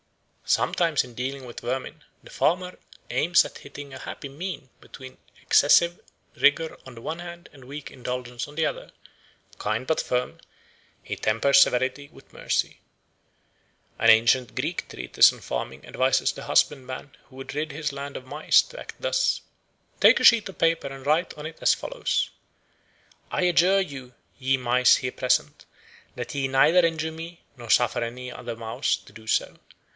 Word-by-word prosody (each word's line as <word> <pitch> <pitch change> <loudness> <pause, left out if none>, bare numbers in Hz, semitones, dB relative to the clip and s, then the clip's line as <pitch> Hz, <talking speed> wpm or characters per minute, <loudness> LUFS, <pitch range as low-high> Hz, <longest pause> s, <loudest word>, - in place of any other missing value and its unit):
Sometimes 165 -6 +2
in 125 - -14
dealing 130 +2 -4
with 120 - -9
vermin 135 +5 -4 0.2
the - - -14
farmer 180 +2 0 0.3
aims 170 +2 +3
at - - -9
hitting 140 0 -10
a 130 - -8
happy 140 - -7
mean 145 -1 -7
between 130 -1 -12 0.2
excessive 170 +1 +4 0.3
rigour 155 +3 +2
on 130 - -11
the 115 - -11
one 160 +6 -5
hand 175 0 -9
and 135 -2 -15
weak 145 +2 -8
indulgence 125 -1 -5
on 145 - -14
the 160 0 +1
other; - - -4 0.7
kind 110 +4 -2
but 160 - +1
firm, 125 0 -2 0.6
he - - -4
tempers 140 +6 +4
severity 130 +3 +1
with - - -19
mercy. - - -1 1.2
An 115 - +4
ancient 115 +2 +4
Greek - - -3
treatise 60 -1 +4
on - - -12
farming 65 +2 -5
advises 130 0 +1
the - - -9
husbandman 130 -1 0
who 130 - -17
would 135 +1 -8
rid 155 +1 -2
his 150 0 -3
lands 140 0 -6
of 130 - -10
mice 145 +4 +3
to - - -12
act - - -9
thus: - - +1 0.6
"Take - - +7
a - - +1
sheet 225 -4 +6
of 190 - -11
paper 165 -3 +1
and 135 -1 -9
write 160 +4 +1
on 150 - -8
it 160 +1 -8
as - - +4
follows: - - -2 1.0
'I - - -1
adjure 180 +2 +4
you, 135 -8 -8 0.2
ye 135 0 +1
mice 125 0 +4
here 130 0 -4
present, 130 0 0 0.5
that 125 +2 -6
ye 135 -1 0
neither 160 +6 +5
injure 160 -1 -1
me 165 +1 -9 0.2
nor 120 -3 -11
suffer 120 +1 +3
another 125 0 -6
mouse 115 -1 -1
to - - -18
do 110 0 -14
so. - - 0
135 Hz, 165 wpm, -25 LUFS, 125-160 Hz, 1.2 s, Take